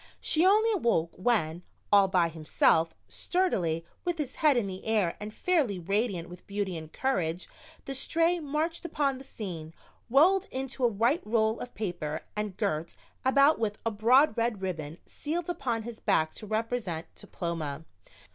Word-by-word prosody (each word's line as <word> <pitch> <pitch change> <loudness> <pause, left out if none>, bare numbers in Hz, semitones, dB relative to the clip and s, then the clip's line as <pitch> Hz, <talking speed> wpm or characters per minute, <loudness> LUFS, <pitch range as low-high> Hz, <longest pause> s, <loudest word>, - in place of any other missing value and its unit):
She 320 - +2
only 430 +4 +5
awoke 235 - +1
when, 180 -6 0 0.3
all 200 -1 +7
by 180 -3 +2
himself, 160 0 +2
sturdily, 175 - 0 0.2
with 350 -1 -1
his 295 -5 -4
head 300 -5 +4
in 235 - +1
the 190 -1 -6
air 210 -6 +1
and 210 +1 -6
fairly 285 - +1
radiant 195 0 -1
with 180 +1 -13
beauty 200 -2 -2
and 160 -1 -7
courage, 180 -10 -1 0.4
the 270 - -4
Stray 330 +6 +2
marched 315 +3 -2
upon 280 -6 -1
the - - -10
scene, 170 -10 -7 0.3
rolled 365 - +5
into 265 0 -4
a - - +7
white 235 - +1
roll 220 0 +1
of 245 - -7
paper 170 -7 -3
and 210 -3 -3
girt 170 -6 -2 0.3
about 275 +3 +5
with 215 -2 -1
a 230 - +1
broad 235 +6 +4
red 230 -4 -1
ribbon 160 -4 -4
sealed 335 +3 -3
upon 235 -9 -2
his 235 0 -8
back 155 0 +1
to 215 - -9
represent 215 -6 -2
"Diploma." 160 -4 -5
220 Hz, 160 wpm, -29 LUFS, 175-275 Hz, 0.4 s, all